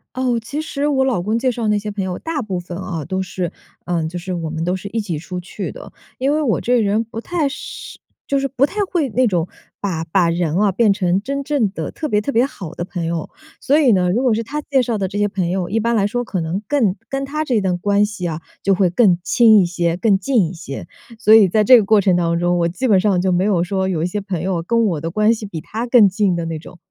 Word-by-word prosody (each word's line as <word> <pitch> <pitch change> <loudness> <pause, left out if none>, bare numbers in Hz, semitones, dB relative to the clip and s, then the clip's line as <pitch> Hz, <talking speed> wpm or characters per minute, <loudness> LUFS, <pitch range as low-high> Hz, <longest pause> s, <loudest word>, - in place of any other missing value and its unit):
哦， 250 -2 0
其 285 +6 -4
实 295 -2 -2
我 265 -2 +2
老 260 -7 +1
公 215 +4 0
介 255 +1 +1
绍 235 -2 -3
那 210 -1 +2
些 210 +1 -5
朋 200 -2 -3
友 180 -1 -4
大 325 -2 -3
部 190 -6 -3
分 175 0 -7
哦， 170 -5 -4
都 190 +5 -2
是 180 -2 -4 0.3
呃， 170 -2 -1
就 175 +2 -5
是 185 +2 -6
我 165 -2 -4
们 160 0 -3
都 180 +2 0
是 190 +2 -7
一 225 - -2
起 180 -7 -4
出 180 +4 -6
去 180 - -6
的。 - - -11 0.3
因 270 +2 +1
为 305 - +1
我 230 - +1
这 245 - +1
个 235 - +3
人 210 +3 +1
不 225 0 -8
太 315 +3 -1
是 290 - -8 0.3
就 280 - +1
是 275 - -1
不 265 -1 -1
太 415 - -6
会 315 -8 0
那 255 +4 +2
种 175 -6 0 0.3
把 170 -5 -2
把 170 +1 +2
人 170 -2 -1
哦， 200 +1 +3
变 205 +1 +3
成 185 -2 +1
真 280 +2 -3
正 270 -8 0
地 160 -6 -5
特 310 - -5
别 210 -7 +1
特 280 - -3
别 240 +1 +3
好 180 - -8
的 175 - -4
朋 175 -2 -4
友。 165 -1 -3 0.3
所 285 +3 +2
以 275 -6 +4
呢， 180 -3 +2
如 230 +7 +1
果 250 -4 +2
是 230 - -2
他 295 +6 -4
介 275 -3 +1
绍 230 -3 -2
的 190 - 0
这 200 +2 -6
些 205 0 +2
朋 190 -4 -2
友， 180 -1 -1
一 220 +5 0
般 235 +1 0
来 200 -3 +2
说 245 +4 -1
可 215 -6 -3
能 165 +5 -3
更 220 -8 +2
跟 275 0 -2
他 305 +3 -2
这 245 -7 +1
段 185 -2 0
关 205 +2 +2
系 205 -4 -4
啊， 160 -1 -4 0.2
就 195 0 +2
会 185 -2 +2
更 185 -2 +4
亲 225 +2 +5
一 180 - +2
些， 170 -1 -1
更 195 0 +2
近 205 -2 +2
一 165 - -7
些。 140 -5 -8 0.3
所 220 -1 +4
以 215 -4 +7
在 215 +4 +3
这 250 +5 +8
个 - - +1
过 210 +1 +4
程 190 -2 +3
当 170 -1 +1
中， 175 0 +1
我 170 - +2
基 220 +10 -2
本 200 -4 +5
上 195 -2 +2
就 185 +1 +1
没 180 +1 +2
有 190 -5 +2
说 190 +1 -1
有 165 -4 -1
一 - - +1
些 205 +4 -3
朋 185 -4 -4
友 185 -3 -1
跟 230 +7 +1
我 170 -8 -1
的 165 - -3
关 215 +5 +3
系 220 -2 -6
比 170 -5 -6
他 225 +9 -5
更 235 -4 +6
近 195 -1 +1
的 170 -1 -3
那 165 -1 -4
种。 175 - -13
200 Hz, 300 characters per minute, -19 LUFS, 175-235 Hz, 0.3 s, 这